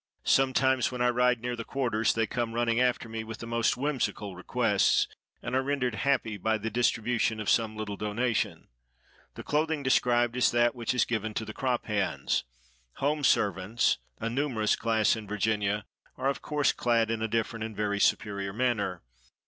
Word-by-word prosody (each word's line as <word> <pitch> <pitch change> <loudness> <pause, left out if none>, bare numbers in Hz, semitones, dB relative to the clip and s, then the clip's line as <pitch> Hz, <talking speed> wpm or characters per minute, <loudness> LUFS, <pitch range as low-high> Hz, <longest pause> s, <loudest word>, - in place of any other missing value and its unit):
Sometimes, 130 -1 +3
when 125 - -5
I 125 0 +3
ride 125 -1 +2
near 125 0 -2
the 115 - -5
quarters, 115 -4 0
they 115 0 +2
come 115 +1 -3
running 120 0 +1
after 125 -2 +1
me 110 0 -5
with 110 0 -7
the - - -8
most 115 0 +1
whimsical 125 -8 -2
requests, 105 +2 +2 0.4
and - - -4
are 130 - +3
rendered 135 -3 -1
happy 115 -3 0
by 110 +3 0
the 110 +1 -4
distribution 115 -1 +1
of 105 - 0
some 110 -2 +1
little 105 -2 -4
donation. 110 +3 -1 0.7
The - - -8
clothing 155 0 0
described 120 -2 +2
is 125 -1 +4
that 120 0 +3
which 120 0 -2
is 125 - +3
given 110 -2 -3
to 110 - -2
the 110 - -7
crop 125 -1 -1
hands. 105 -3 -1 0.5
Home 145 +2 -1
servants, 105 -2 +2 0.2
a 115 - -2
numerous 120 -4 0
class 110 -2 +2
in 110 -2 -8
Virginia, 105 0 0 0.3
are 130 +1 0
of 140 - -3
course 150 -1 +1
clad 115 -2 +1
in 115 -1 -2
a 110 - 0
different 115 0 -2
and 110 -1 -6
very 100 -1 -1
superior 100 -2 0
manner. 105 -7 -1
115 Hz, 180 wpm, -28 LUFS, 110-125 Hz, 0.7 s, is